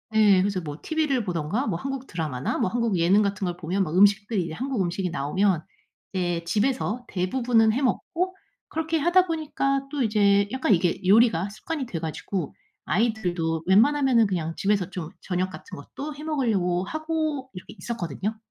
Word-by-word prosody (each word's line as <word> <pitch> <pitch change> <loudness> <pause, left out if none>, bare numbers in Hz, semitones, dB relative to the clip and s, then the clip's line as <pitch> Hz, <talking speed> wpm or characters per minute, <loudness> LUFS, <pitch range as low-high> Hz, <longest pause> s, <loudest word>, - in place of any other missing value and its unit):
예 205 -4 +6
그래서 195 -1 0
뭐 150 -2 -7
TV를 300 -7 0
보든가 180 - -1
뭐 170 -5 -1
한국 270 +1 -5
드라마나 150 -7 -3
뭐 185 - +1
한국 230 -4 0
예능 180 +5 +4
같은 200 -1 -1
걸 175 -1 -2
보면 180 +3 -1
막 165 -1 -4
음식들이 205 0 +4
이제 160 - -6
한국 255 0 -2
음식이 180 +1 -1
나오면 170 +4 0 0.5
예 175 -2 -1
집에서 240 +5 -1
대부분은 225 +4 +2
해 265 - -1
먹고 360 +8 -1 0.3
그렇게 320 +1 -1
하다 355 +4 +4
보니까 275 -4 -1
또 290 -2 -2
이제 200 -2 +3
약간 260 -5 +2
이게 175 0 +1
요리가 205 -3 +4
습관이 285 +6 -5
돼 175 -8 -5
가지고 165 +1 -4 0.3
아이들도 175 -5 0
웬만하면은 235 +2 +4
그냥 165 -4 -2
집에서 195 -2 +1
좀 175 -4 -6
저녁 185 0 -1
같은 - - -10
것도 285 - -7
해 300 - -9
먹으려고 210 - 0
하고 310 -3 -2
이렇게 180 - -10
있었거든요. 210 - -4
205 Hz, 375 characters per minute, -25 LUFS, 180-265 Hz, 0.5 s, 예